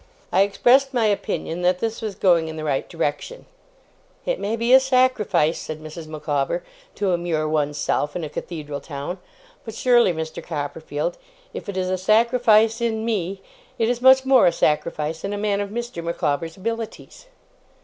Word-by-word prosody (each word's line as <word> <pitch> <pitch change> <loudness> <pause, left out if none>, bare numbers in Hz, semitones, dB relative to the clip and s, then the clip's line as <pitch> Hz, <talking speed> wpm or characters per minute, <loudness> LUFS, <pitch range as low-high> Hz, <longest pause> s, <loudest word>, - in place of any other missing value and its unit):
I 190 - +4
expressed 250 +7 +3
my 235 -2 +3
opinion 195 -4 -1
that 180 0 +2
this 225 +4 -3
was 215 -3 -4
going 175 -4 +3
in 160 - -6
the 155 - -6
right 140 -3 -1
direction. 165 - -3 0.8
'It - - -1
may 215 +3 -1
be 235 +2 +2
a 265 - +10
sacrifice,' 255 - +2
said 155 0 -6
Mrs. 155 +1 -9
Micawber, 150 +2 -2 0.3
'to 195 -3 0
immure 170 -3 -1
one's 150 -1 0
self 145 0 -1
in 175 - -3
a 155 - -4
Cathedral 150 -3 -6
town; 145 +5 -6 0.4
but 225 -1 -8
surely, 240 -6 +4
Mr. 160 -1 -5
Copperfield, 150 +1 -4 0.3
if - - -7
it 195 - -4
is 185 0 -1
a 185 - -1
sacrifice 225 +2 +3
in 220 -1 -1
me, 195 -3 -2 0.3
it 225 -2 +1
is 245 0 -1
much 260 +1 +6
more 265 -5 +6
a - - +5
sacrifice 155 0 -1
in 200 - -3
a - - -3
man 205 -1 0
of 200 - -4
Mr. 235 -5 -5
Micawber's 165 0 -2
abilities. 230 - -6
185 Hz, 175 wpm, -22 LUFS, 160-230 Hz, 0.8 s, a